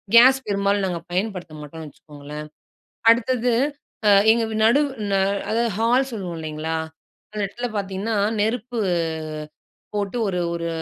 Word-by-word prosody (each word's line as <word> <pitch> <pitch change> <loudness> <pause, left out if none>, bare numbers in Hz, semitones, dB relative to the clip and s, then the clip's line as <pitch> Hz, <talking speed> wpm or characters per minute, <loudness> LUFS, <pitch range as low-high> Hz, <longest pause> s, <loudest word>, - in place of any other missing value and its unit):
Case 260 +3 +8
பெரும்பாலும் 200 0 +1
நாங்க 175 -2 -2
பயன்படுத்த 185 -4 -3
மாட்டோன்னு 155 +2 -8
வச்சுக்கோங்களேன்! 150 +1 -10 0.7
அடுத்தது 245 +1 +1 0.6
அ - - +7 0.2
எங்க 230 +1 +4 0.2
நடு 235 +6 +5 0.4
அ - - +3 0.3
அதாவது 230 +1 +1
ஹால் 245 +4 +3
சொல்லுவோம் 185 -6 -4
இல்லேங்களா! 155 0 -3 0.6
அந்த 215 - -4
இடத்துல 240 +5 -4
பார்த்தீங்கன்னா, 200 +2 -2 0.2
நெருப்பு 235 +3 -1 1.2
போட்டு 205 +3 -1
ஒரு 180 -2 -1
ஒரு 170 0 -3
200 Hz, 120 wpm, -23 LUFS, 170-230 Hz, 1.2 s, Case